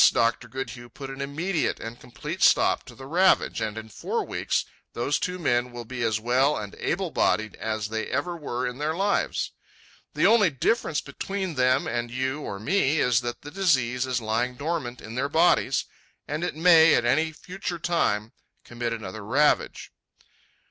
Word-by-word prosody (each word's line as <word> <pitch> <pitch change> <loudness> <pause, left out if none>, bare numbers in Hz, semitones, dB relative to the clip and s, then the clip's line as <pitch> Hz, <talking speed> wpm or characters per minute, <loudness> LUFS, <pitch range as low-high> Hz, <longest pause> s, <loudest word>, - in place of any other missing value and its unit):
Dr. 115 0 +1
Goodhue 130 -2 -6
put 135 0 -8
an 135 +1 -7
immediate 160 +5 -1
and 115 +1 -7
complete 120 - -7
stop - - +4
to - - -12
the 135 - -10
ravage, 180 +7 +3
and 110 0 -3
in 110 0 -6
four 110 - -3
weeks - - -1 0.3
those 130 +5 0
two 180 0 -2
men 125 -7 +1
will 120 -1 -7
be 125 +1 -6
as 110 -2 +1
well 130 +6 +2
and 105 -2 -6
able - - -1
bodied 110 0 +1
as 110 -1 -3
they 110 0 -3
ever 145 +7 -2
were 130 -6 -3
in 125 +2 -4
their 155 +2 -1
lives. 200 +3 0 0.6
The - - +2
only 220 -5 +6
difference 150 - 0
between 190 +5 -4
them 130 -2 +2
and 120 +1 -2
you 130 +3 -2
or 100 -8 -5
me 150 - +2
is 125 -2 +3
that 120 -1 -5
the 145 - -8
disease 130 -9 +1
is 125 -1 0
lying 115 +3 -1
dormant 140 -4 -3
in 110 - -9
their 135 +4 -1
bodies 165 +4 +3 0.4
and 160 +4 -2
may 165 -1 +7
at 120 - +1
any 155 +6 +2
future 180 +2 -6
time 115 -11 0 0.3
commit 120 -1 -3
another 110 -2 -6
ravage. 140 +8 +1
130 Hz, 175 wpm, -26 LUFS, 120-160 Hz, 0.6 s, may